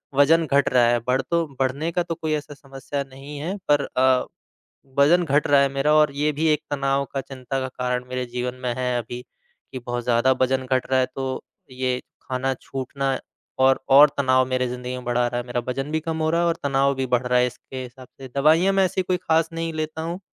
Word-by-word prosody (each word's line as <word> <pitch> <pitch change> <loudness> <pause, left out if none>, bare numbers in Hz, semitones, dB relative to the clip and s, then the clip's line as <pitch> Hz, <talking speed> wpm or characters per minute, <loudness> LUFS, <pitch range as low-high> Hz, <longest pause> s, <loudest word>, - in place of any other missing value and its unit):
वज़न 160 +4 +5
घट 140 -1 +2
रहा 120 -2 +5
है। 120 0 +3
बढ़ 130 +1 +2
तो 170 +5 0
बढ़ने 135 +5 0
का 175 +1 0
तो 170 -1 -4
कोई 155 -1 -2
ऐसा 150 -1 -4
समस्या 140 0 -6
नहीं 140 +2 -10
है 175 +7 -3
पर 145 -1 +4
अ, 130 0 +2 0.7
वज़न 160 +6 +5
घट 145 0 +2
रहा 140 -1 +5
है 140 - +3
मेरा, 140 +2 +1
और 150 -2 +4
ये 150 +1 +1
भी 150 +3 -2
एक 150 -1 +2
तनाव 140 -1 +1
का, 135 - -1
चिंता 135 0 -5
का 130 - -2
कारण 125 -1 -2
मेरे 125 0 -3
जीवन 125 +1 -4
में 125 -1 0
है 125 -1 -1
अभी 120 +1 -5 0.5
कि 130 - -5
बहुत 120 0 -3
ज़्यादा 120 +2 +3
वज़न 130 0 +1
घट 130 0 0
रहा 130 - +4
है। 130 - +3
तो 130 -1 -3 0.3
ये 130 0 -1 0.2
खाना 130 +1 -2
छूटना 135 0 -3 0.5
और 135 0 +4
और 145 +2 +8
तनाव 130 -2 +3
मेरी 130 -1 0
ज़िंदगी 125 0 -5
में 125 - -7
बढ़ा 120 0 +1
रहा 120 0 -2
है। - - -12
मेरा 125 0 -1
वज़न 135 +3 -3
भी 160 - +1
कम 160 0 -4
हो 155 - +2
रहा 170 +1 +2
है 170 - +2
और 170 - +1
तनाव 140 0 +2
भी 130 0 -1
बढ़ 125 +1 -2
रहा 125 0 +3
है 125 - +3
इसके 130 +1 -8
हिसाब 125 +1 -12
से। 135 - -7
दवाइयाँ 160 +7 +4
मैं 195 -1 +4
ऐसी 185 +1 -1
कोई 185 0 0
खास 160 0 +3
नहीं 165 0 -3
लेता 155 0 -4
हूँ। 170 +3 -4
135 Hz, 235 wpm, -23 LUFS, 125-150 Hz, 0.7 s, और